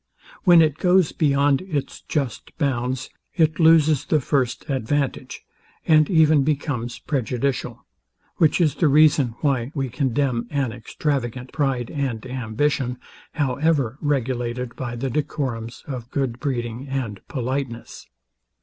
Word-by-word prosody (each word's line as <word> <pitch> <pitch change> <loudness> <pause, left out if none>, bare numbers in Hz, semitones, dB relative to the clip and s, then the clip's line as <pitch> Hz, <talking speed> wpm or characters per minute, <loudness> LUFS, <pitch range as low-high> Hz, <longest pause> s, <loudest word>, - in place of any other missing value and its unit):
When 175 -3 +8
it 155 -1 0
goes 180 -2 +4
beyond 140 -2 +2
its 160 -7 -4
just 140 -7 -4
bounds, 130 -3 -1 0.2
it 160 -2 +2
loses 160 -3 +5
the 155 - +2
first 130 -2 -1
advantage, 135 +1 -2 0.4
and 155 -2 +5
even 155 -4 +5
becomes 135 -5 -2
prejudicial; 130 -2 -2 0.5
which 155 +1 +3
is 155 -5 +3
the 160 - +2
reason 145 -4 +4
why 135 -4 0
we 135 -2 -1
condemn 125 -2 0
an 140 -4 -1
extravagant 125 +1 -3
pride 135 -5 -1
and 130 -7 -3
ambition, 125 +1 -1 0.4
however 140 -2 0
regulated 125 -3 -2
by 120 -2 -5
the 130 +2 -3
decorums 125 -5 -3
of 125 -4 -6
good 125 -3 -2
breeding 125 -2 -3
and 125 -7 -4
politeness. 130 -2 -4
135 Hz, 120 wpm, -23 LUFS, 120-150 Hz, 0.5 s, When